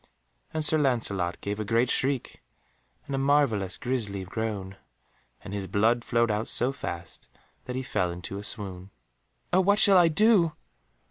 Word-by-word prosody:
And 155 -1 -1
Sir 155 +1 +4
Lancelot 110 -10 0
gave 100 +1 -4
a - - -1
great 115 +4 +1
shriek, 135 -1 -1 0.6
and 140 - -6
a 135 - 0
marvellous 135 -9 +1
grisly 110 -6 -3
groan, 100 -1 -4 0.7
and 100 - -8
his 100 -2 -4
blood 115 +6 +2
flowed 115 -1 +1
out 105 +2 -2
so 125 +2 +3
fast 85 -9 -7 0.4
that 125 - -5
he 130 - -3
fell 90 -9 -1
into 90 +3 -6
a - - -8
swoon. 95 -3 -6 0.6
"Oh 185 - +5
what 200 +2 +3
shall 200 -3 +6
I 175 - +6
do?" 175 -1 +4
115 Hz, 160 wpm, -27 LUFS, 100-140 Hz, 0.7 s, shall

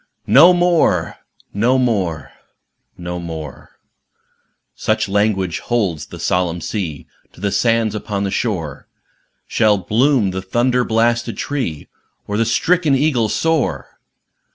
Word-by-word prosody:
"No 160 +7 +7
moreâno 175 -2 +2 0.4
moreâno 110 - 0 0.7
moreâ" 85 -5 -7 1.1
(Such - - -1
language 100 -3 0
holds 100 -11 -2
the - - -10
solemn 90 -1 0
sea 85 -8 -4 0.3
To - - -17
the 100 +1 -1
sands 115 -2 +1
upon 105 -1 -3
the 100 - -2
shore) 85 - -3 0.6
Shall 105 -2 +2
bloom 110 +3 +1
the 95 0 -4
thunder 120 +6 +1
blasted 115 +1 0
tree, 125 - -3 0.4
Or 105 - -4
the 115 +2 +1
stricken 160 +5 +2
eagle 130 -6 +1
soar! 160 +1 -1
110 Hz, 110 wpm, -18 LUFS, 90-125 Hz, 1.1 s, No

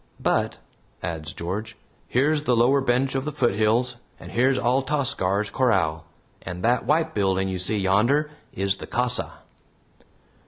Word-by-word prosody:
But," - - 0 0.5
adds 80 -2 -3
George, 105 +7 -5 0.3
"here's 145 +4 +1
the 125 - +3
lower 130 +4 +4
bench 130 +1 +1
of 135 -1 -1
the 150 - -3
foothills, 120 -2 +1 0.2
and - - -10
here's 130 +3 +2
Altascar's 120 -6 0
corral, 90 -11 +1 0.4
and 90 +1 -7
that 120 0 +2
White 160 +2 +2
building 95 -2 +1
you 95 -1 -3
see 100 +4 0
yonder 120 +11 +2 0.2
is 100 0 -1
the - - -8
casa." 125 +1 -1
120 Hz, 140 wpm, -24 LUFS, 95-135 Hz, 0.5 s, lower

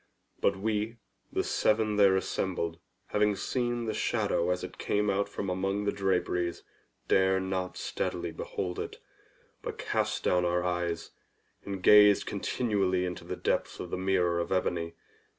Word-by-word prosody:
But 100 - +2
we, 105 +3 -1 0.3
the - - 0
seven 110 -1 +2
there 100 -2 +6
assembled, 85 -3 -2 0.3
having 105 0 +2
seen 120 +2 -1
the 110 - -1
shadow 85 - 0
as 90 0 0
it - - -8
came 105 0 +1
out 100 +1 0
from 100 -1 -4
among 95 +2 -1
the 100 - +2
draperies, 90 -3 0 0.4
dared 95 0 +3
not 95 -1 -3
steadily - - -3
behold 90 -2 -4
it, - - -5 0.6
but - - -5
cast - - -1
down 90 0 +3
our 90 0 +1
eyes, 90 -2 -2 0.5
and 95 -2 -5
gazed 105 -1 +7
continually 95 -6 0
into 90 -1 -5
the - - -4
depths - - -1
of 90 - -6
the - - 0
mirror 90 -2 +2
of 85 - -3
ebony. 85 -3 0
95 Hz, 150 wpm, -30 LUFS, 90-105 Hz, 0.6 s, gazed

